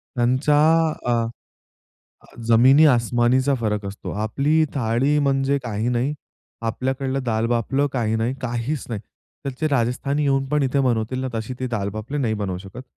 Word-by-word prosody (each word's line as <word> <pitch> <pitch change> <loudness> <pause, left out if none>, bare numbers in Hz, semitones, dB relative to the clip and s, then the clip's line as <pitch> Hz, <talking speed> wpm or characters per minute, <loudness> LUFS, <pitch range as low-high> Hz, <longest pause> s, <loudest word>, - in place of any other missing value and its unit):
त्यांचा 130 +5 +2 0.5
अ, 120 - +2 1.4
जमिनी 130 +7 +6
आसमानीचा 125 +2 +3
फरक 105 -2 -1
असतो. 100 +1 -7
आपली 140 +10 +1
थाळी 130 +4 +1
म्हणजे 140 0 +1
काही 115 0 -2
नाही. 125 +4 0 0.5
आपल्याकडलं 130 +3 -2
दाल 110 -1 0
बाफलं 120 +4 +1
काही 110 -3 0
नाही, 115 +4 -1
काहीच 120 +4 -2
नाही. 110 -4 -4 0.4
तिथलचे 140 +3 -2
राजस्थानी 140 +3 0
येऊन 135 -1 +2
पण 150 0 +1
इथे 135 +1 +1
बनवतील 125 0 0
ना, 130 - -2
तशी 115 +3 -4
ती 130 - -1
दाल 105 -5 -2
बाफलं 140 +7 -4
नाही 110 -2 0
बनवू 95 -3 -3
शकत. 95 +6 -10
125 Hz, 150 wpm, -22 LUFS, 115-135 Hz, 1.4 s, जमिनी